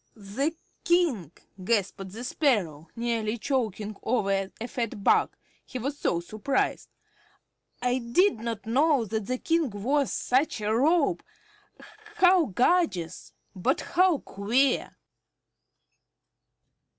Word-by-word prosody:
"The 230 Hz, +9 st, -2 dB, 0.3 s
King!" 315 Hz, -, +1 dB, 0.3 s
gasped 195 Hz, -2 st, -1 dB
the 225 Hz, +5 st, -7 dB
Sparrow, 190 Hz, -, 0 dB
nearly 230 Hz, -1 st, -1 dB
choking 220 Hz, -5 st, -2 dB
over 195 Hz, -5 st, 0 dB
a 230 Hz, -, -4 dB
fat 230 Hz, -5 st, -4 dB
bug, -, -, +3 dB, 0.3 s
he -, -, -7 dB
was 275 Hz, +4 st, -4 dB
so 170 Hz, -, 0 dB
surprised. 215 Hz, +9 st, -2 dB, 0.9 s
"I 250 Hz, +1 st, +1 dB
did 250 Hz, -, +2 dB
not 230 Hz, -2 st, -5 dB
know 270 Hz, +2 st, +2 dB
that 220 Hz, -1 st, -3 dB
the 255 Hz, -, -1 dB
King 325 Hz, 0 st, 0 dB
wore 255 Hz, +7 st, 0 dB
such 260 Hz, 0 st, 0 dB
a 215 Hz, +1 st, 0 dB
robe. 300 Hz, +5 st, +2 dB, 0.9 s
How 360 Hz, -2 st, +5 dB
gorgeous 240 Hz, -, 0 dB, 0.2 s
but 240 Hz, +9 st, 0 dB
how 360 Hz, -2 st, +3 dB
queer!" 245 Hz, +5 st, 0 dB
235 Hz, 110 wpm, -27 LUFS, 205-280 Hz, 0.9 s, How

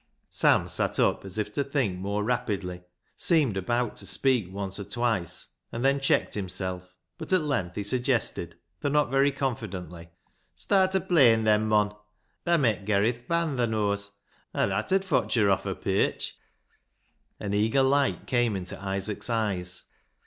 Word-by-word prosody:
Sam -, -, +3 dB
sat -, -, 0 dB
up, -, -, +2 dB
as 95 Hz, +1 st, -6 dB
if 105 Hz, -1 st, -2 dB
to 140 Hz, -, 0 dB
think 130 Hz, -10 st, -1 dB
more 100 Hz, +2 st, -2 dB
rapidly, 105 Hz, -7 st, -2 dB, 0.3 s
seemed 150 Hz, -, +2 dB
about 120 Hz, +5 st, -1 dB
to 100 Hz, -, -4 dB
speak 115 Hz, -1 st, +2 dB
once 100 Hz, 0 st, -3 dB
or -, -, -4 dB
twice, 105 Hz, -6 st, -1 dB, 0.2 s
and 120 Hz, +3 st, -3 dB
then 140 Hz, +1 st, +3 dB
checked 135 Hz, -, +1 dB
himself; 95 Hz, -2 st, -4 dB, 0.2 s
but -, -, -7 dB
at 185 Hz, -2 st, +4 dB
length 100 Hz, -12 st, -2 dB
he 105 Hz, -, -2 dB
suggested, 125 Hz, +3 st, 0 dB, 0.2 s
though 145 Hz, -, -1 dB
not 150 Hz, -3 st, +2 dB
very 135 Hz, +1 st, +4 dB
confidently 95 Hz, -, -5 dB, 0.2 s
— -, -, -38 dB
" -, -, -39 dB
Start 190 Hz, -1 st, +2 dB
o' -, -, +4 dB
playin' 130 Hz, -12 st, +4 dB
then, 110 Hz, 0 st, +3 dB
mon. 105 Hz, -1 st, +2 dB, 0.5 s
Thaa 170 Hz, 0 st, +5 dB
met 115 Hz, -, +1 dB
ger 100 Hz, 0 st, +2 dB
i' 115 Hz, -, +3 dB
th' 120 Hz, 0 st, -15 dB
band, 170 Hz, -5 st, 0 dB
thaa 120 Hz, -, +3 dB
knows, 100 Hz, -2 st, -1 dB, 0.5 s
an' -, -, +2 dB
that -, -, -2 dB
'ud 195 Hz, 0 st, +2 dB
fotch 165 Hz, -8 st, +1 dB
her 105 Hz, -4 st, +4 dB
off 95 Hz, -, 0 dB
her -, -, -2 dB
pierch." -, -, -1 dB, 1.0 s
An 100 Hz, -1 st, -3 dB
eager 110 Hz, +6 st, +3 dB
light 140 Hz, +1 st, +2 dB
came 120 Hz, -4 st, +1 dB
into 90 Hz, -1 st, -6 dB
Isaac's 100 Hz, +2 st, -2 dB
eyes. 95 Hz, -6 st, -2 dB
110 Hz, 175 wpm, -27 LUFS, 100-135 Hz, 1.0 s, Thaa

